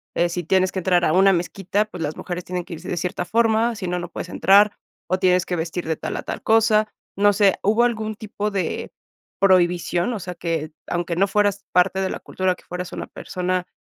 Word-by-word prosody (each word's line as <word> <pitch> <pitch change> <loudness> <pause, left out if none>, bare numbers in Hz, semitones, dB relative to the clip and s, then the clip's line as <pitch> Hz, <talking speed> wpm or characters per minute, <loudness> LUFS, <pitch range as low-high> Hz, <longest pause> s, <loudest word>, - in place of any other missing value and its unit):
eh, 175 - +3
si 175 +1 -3
tienes 185 +3 +2
que 190 - -1
entrar 180 -1 +2
a - - +2
una 195 +2 +6
mezquita, 190 +3 -1
pues, 185 -5 -9
las 150 0 -3
mujeres 180 0 -5
tienen 180 -1 -3
que - - -8
irse 165 +3 -11
de - - -1
cierta 180 +1 -2
forma, 230 +2 +2
si 195 -4 -5
no, 180 - -1
no 175 - -6
puedes 175 - -6
entrar 200 +4 +4 0.3
o 185 +2 0
tienes 180 -1 +3
que 180 - -2
vestir 165 +2 -3
de 160 - 0
tal - - -4
a - - -5
tal - - -5
cosa. 220 -1 +3 0.2
No 205 +1 +4
sé, 200 -1 +3
¿hubo 220 +4 +3
algún 220 -3 -1
tipo 210 0 -4
de 195 -2 -3 0.5
prohibición?, 180 +1 +2
o 220 - -4
sea, 180 0 -5
¿que 165 -2 -3 0.2
aunque 175 -1 -2
no 195 +2 +3
fueras 200 0 +1
parte 190 +1 +3
de 190 - 0
la - - -4
cultura, 185 -1 -1
que - - -21
fueras 180 0 -6
una - - -5
persona 180 -1 -3
185 Hz, 225 wpm, -22 LUFS, 175-205 Hz, 0.5 s, una